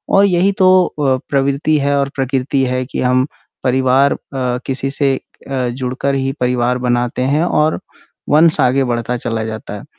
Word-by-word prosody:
और 200 +1 +6
यही 185 +1 +2
तो 185 - +5 0.2
अ, 135 -3 0
प्रवृत्ति 140 +2 +1
है 140 0 +1
और 140 0 0
प्रकृति 135 0 0
है 130 0 -1
कि - - -4
हम 130 +1 +2 0.4
परिवार 130 +2 +3
अ, - - -6 0.5
किसी 135 0 -2
से 135 -1 +1 0.4
अ, 130 -2 -1
जुड़कर 130 +2 -2
ही 135 0 -1
परिवार 125 0 +1
बनाते 120 +1 0
हैं 160 - +2
और 155 -2 +1 0.5
वंश 155 +1 +4
आगे 130 +2 +3
बढ़ता 120 0 -2
चला 115 -2 -3
जाता 110 -2 -6
है। - - -13
135 Hz, 170 wpm, -16 LUFS, 125-140 Hz, 0.5 s, और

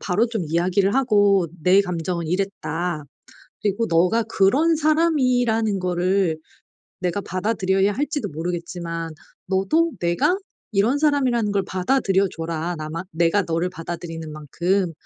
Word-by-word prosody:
바로 200 +5 +1
좀 225 -5 -3
이야기를 185 +5 +1
하고 205 -8 +3 0.2
"내 190 +2 +5
감정은 170 -2 -3
이랬다. 175 -3 -2 0.6
그리고 210 +2 0
너가 180 +7 +3
그런 255 +11 +3
사람이라는 255 - +2
거를 180 -1 +1 0.6
내가 180 +1 -1
받아들여야 195 0 0
할지도 290 +3 -2
모르겠지만 165 0 -4 0.4
너도 195 - +2
내가 175 - +1 0.4
이런 225 +8 +3
사람이라는 260 -8 +2
걸 200 -1 +1
받아들여 195 0 +1
줘라, 165 +1 -3
나만 155 +3 -5
내가 170 +4 +2
너를 165 +2 -1
받아들이는 165 -2 -6
만큼. 175 +5 -1
190 Hz, 305 characters per minute, -22 LUFS, 170-225 Hz, 0.6 s, 내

